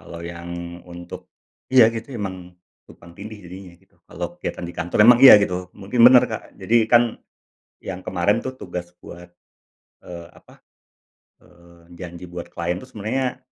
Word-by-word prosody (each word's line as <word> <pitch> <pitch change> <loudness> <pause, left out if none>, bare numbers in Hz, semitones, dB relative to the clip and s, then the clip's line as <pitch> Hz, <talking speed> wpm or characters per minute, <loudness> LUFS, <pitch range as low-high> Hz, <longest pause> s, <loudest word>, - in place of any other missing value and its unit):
Kalau 85 - -11
yang 85 0 -8 0.4
untuk 85 0 -10 0.4
iya 125 -3 +8
gitu 115 +2 -7
emang 95 -3 -5 0.5
tumpang 85 0 -16
tindih 110 +1 -9
jadinya 90 0 -11
gitu. 95 +2 -33
Kalau - - -5
kegiatan - - -5
di - - -8
kantor 90 +4 -3
emang 120 +1 +7
iya 130 - +11
gitu. 90 -2 -3
Mungkin 105 +5 -3
bener, 125 -1 +8
Kak. - - -5 0.2
Jadi 115 - -2 0.2
kan 120 - +7 0.8
yang 95 -1 -6
kemarin 95 +5 0
tuh 130 - -4
tugas 90 -1 -6
buat, 90 0 -12 0.8
eee, 85 -1 -9
apa, - - -22 0.8
eee, 85 0 -20
janji 90 0 -9
buat 85 -1 -7
klien 85 +1 -3
itu - - -12
sebenarnya 125 +5 -3
90 Hz, 155 wpm, -21 LUFS, 85-110 Hz, 0.8 s, iya